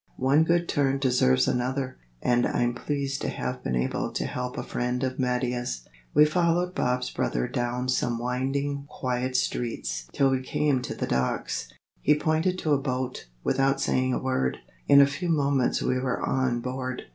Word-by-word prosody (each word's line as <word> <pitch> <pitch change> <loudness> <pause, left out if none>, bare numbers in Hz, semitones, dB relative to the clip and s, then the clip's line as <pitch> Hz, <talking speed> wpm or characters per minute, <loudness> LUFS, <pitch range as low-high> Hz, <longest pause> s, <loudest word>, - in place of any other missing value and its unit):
One 135 +4 +4
good 170 +1 +2
turn 135 -1 +1
deserves 125 - +3
another. 130 +1 -1 0.3
And 120 0 +3
I'm 120 0 +1
pleased 140 +1 -2
to - - -1
have 65 - -4
been 65 - -1
able 60 - -1
to - - -1
help 125 0 -4
a - - -2
friend 125 +1 -2
of 130 0 -2
Mattia's." 125 - -1 0.3
We 150 - +8
followed 175 +3 +1
Bob's 125 -3 0
brother - - -1
down 125 +1 -2
some 125 -2 +1
winding 135 +4 -2
quiet 130 0 -2
streets - - -2
till 135 -1 +3
we 130 -1 +1
came 135 0 +1
to - - -5
the - - -2
docks. 65 0 -1 0.3
He 150 - +4
pointed 160 +4 +1
to 155 -4 +1
a 140 - +3
boat, 130 - -3 0.2
without 135 0 +2
saying 130 -1 +1
a - - 0
word. 130 - 0 0.3
In 140 - +8
a - - +8
few 145 +6 -3
moments 140 -5 +2
we 130 - +1
were 130 -1 -1
on 130 -2 0
board. 130 0 -4
130 Hz, 175 wpm, -27 LUFS, 125-140 Hz, 0.3 s, We